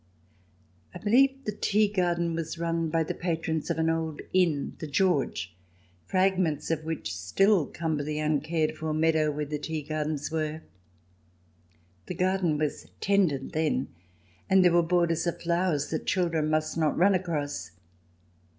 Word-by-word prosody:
I - - -3
believe 265 +8 +3
the 210 - -1
tea 210 +1 +2
garden 175 -4 0
was 165 0 -4
run 165 -1 -1
by 165 +1 +1
the - - -3
patrons 165 -2 -2
of - - 0
an 160 0 +1
old 160 -2 -1
inn, 170 -6 +2
" - - -29
The 155 - -5
George," 140 - 0 0.5
fragments 185 -6 +1
of 160 -1 -1
which 160 0 -4
still 195 -6 +2
cumber 160 -3 -2
the 150 +1 -3
uncared 155 +1 0
for 155 0 -3
meadow 155 -1 +2
where 150 0 -2
the 150 +1 -4
tea 155 0 -4
gardens 150 0 -3
were. 155 0 -2 1.4
The - - -4
garden 185 -4 +1
was 150 -1 -2
tended 185 -9 +1
then, 155 -4 0 0.6
and 190 -1 +5
there 175 - +5
were 175 - +5
borders 170 -1 +1
of 170 - -2
flowers 170 -3 0
that 160 - -3
children 165 -5 +1
must 155 +1 0
not 155 -3 +1
run 195 +4 +5
across. 150 - -2
160 Hz, 155 wpm, -28 LUFS, 155-180 Hz, 1.4 s, and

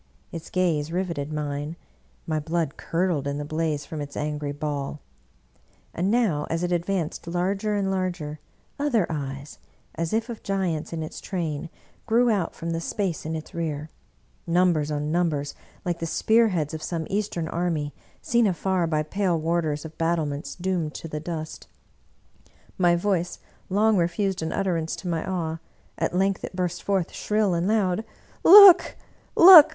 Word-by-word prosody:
Its 165 -3 -7
gaze 165 -5 0
riveted 170 -5 -2
mine; 150 +1 -3 0.5
my 155 -1 -1
blood 160 -1 -2
curdled 165 -5 -1
in 140 0 -2
the 145 - -4
blaze 155 -1 -2
from 155 -2 -6
its 145 -1 -7
angry 150 -1 -2
ball; 145 0 -4 0.9
and 180 +3 0
now 205 -11 +1
as 165 +1 -1
it 180 - -1
advanced 175 -2 -2
larger 195 +5 -1
and 195 -1 0
larger, 175 -5 -3 0.4
other 250 -10 +2
Eyes, 140 -1 -5 0.3
as 165 -1 -3
if 225 +1 0
of 235 -3 -7
giants 185 -6 -2
in 165 -1 -3
its 155 - -7
train, 165 -4 -3 0.4
grew 235 +1 +4
out 195 -6 -1
from 165 0 -4
the 165 0 -2
space 180 -3 -2
in 160 - -2
its 155 - -7
rear 155 -2 -3 0.3
— - - -37
numbers 160 -5 +2
on 150 0 -2
numbers, 155 -4 0 0.3
like 175 -1 -1
the 165 - -3
spearheads 185 -5 +2
of 160 - -5
some 165 -1 -3
Eastern 195 -5 -2
army, 165 -4 -1 0.3
seen 235 -7 +3
afar 185 -1 0
by 155 -1 0
pale 180 +1 0
warders 160 -2 -1
of 160 0 -9
battle 165 -1 +1
ments 140 0 -5
doomed 175 -4 -2
to - - -6
the 150 -1 -4
dust. 155 -1 -6 1.1
My 175 -2 +4
voice 180 -1 0 0.3
long 210 +2 +3
refused 185 +2 0
an 160 - -2
ut 195 - -1
terance 165 -3 -1
to 185 - -8
my 165 -2 -1
awe; 165 -3 -2 0.4
at - - -1
length 195 +1 +1
it - - -6
burst 180 -1 -2
forth 195 -4 -1
shrill 210 -3 +1
and 170 +2 0
loud: 210 -2 +1 0.2
" - - -29
Look, 385 -1 +9 0.4
look! 335 -3 +11
170 Hz, 165 wpm, -25 LUFS, 155-190 Hz, 1.1 s, look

